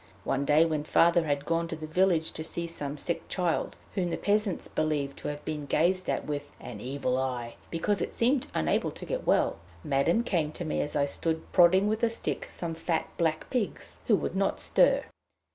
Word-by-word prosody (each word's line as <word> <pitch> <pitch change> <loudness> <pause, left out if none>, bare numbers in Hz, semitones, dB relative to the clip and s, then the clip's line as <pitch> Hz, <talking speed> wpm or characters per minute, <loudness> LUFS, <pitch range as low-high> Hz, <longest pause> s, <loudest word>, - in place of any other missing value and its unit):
One 135 +1 0
day 150 +3 +5
when 155 -2 -1
Father 170 +2 +4
had 145 -1 -1
gone 165 0 0
to 165 - -4
the 155 0 -7
village 165 0 +2
to 160 - -5
see 170 +1 -2
some 150 -3 -5
sick 170 +4 -2
child 180 -3 -1 0.2
whom 180 -3 0
the - - -2
peasants 205 -2 0
believed 150 -3 -1
to - - -6
have 145 0 -5
been 150 -2 -4
gazed 185 +5 +2
at - - -1
with 145 -1 -4
"an 105 -4 -8
evil 130 0 -1
eye," 125 -3 -3
because 195 +5 0
it - - -2
seemed 250 +3 +1
unable - - +1
to - - -8
get - - -4
well, - - +2 0.2
Madame 150 +9 +2
came 165 -9 0
to 175 - -5
me 155 - 0
as 145 - -2
I 140 - +3
stood 160 +3 -2
prodding 185 +3 +6
with 215 +1 0
a 235 - +3
stick 230 - -3
some 170 -2 -4
fat 165 0 -1
black 160 -2 0
pigs 245 -5 -3
who - - +6
would - - -2
not - - +1
stir. - - +3
160 Hz, 205 wpm, -29 LUFS, 145-180 Hz, 0.2 s, prodding